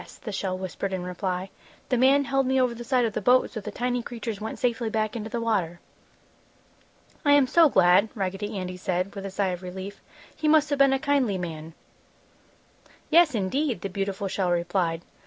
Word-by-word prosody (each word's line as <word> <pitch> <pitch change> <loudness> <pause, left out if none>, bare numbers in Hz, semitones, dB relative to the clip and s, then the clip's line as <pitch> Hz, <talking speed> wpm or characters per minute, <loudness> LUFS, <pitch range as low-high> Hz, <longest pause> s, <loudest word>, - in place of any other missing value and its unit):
the 215 - -5
shell 190 -2 -2
whispered 190 +1 -4
in 185 -1 -3
reply. 180 +1 -3 0.4
"The 255 - +2
man 275 +3 +5
held 270 -1 +1
me 265 0 +2
over 250 -2 +2
the 235 +1 -8
side 245 0 +2
of 220 - -2
the - - -2
boat, 250 +5 +3
so 220 - -5
the 210 - -6
tiny 245 +3 -2
creatures 230 -3 -6
went 220 +1 -5
safely 240 -2 -1
back 215 0 -1
into 220 -1 -5
the 235 - -3
water!" 190 -7 -1 1.4
"I 290 -2 +5
am 285 -2 +6
so 325 +4 +5
glad!" 190 0 +4
Raggedy 195 +1 -3
Andy 185 -1 -5
said, 185 +1 -2
with 195 -1 -6
a - - -5
sigh 195 0 -1
of 180 -1 -4
relief. 190 +2 -8 0.3
"He 310 - -2
must 305 -1 +4
have 285 - 0
been 275 -1 +6
a - - +2
kindly 270 -7 +1
man!" 165 -2 -6 1.4
"Yes, 320 -4 +5
indeed!" 225 - -1
the 195 - -4
beautiful 195 +1 -3
shell 190 -1 -1
replied. 170 -1 0
210 Hz, 195 wpm, -26 LUFS, 185-250 Hz, 1.4 s, am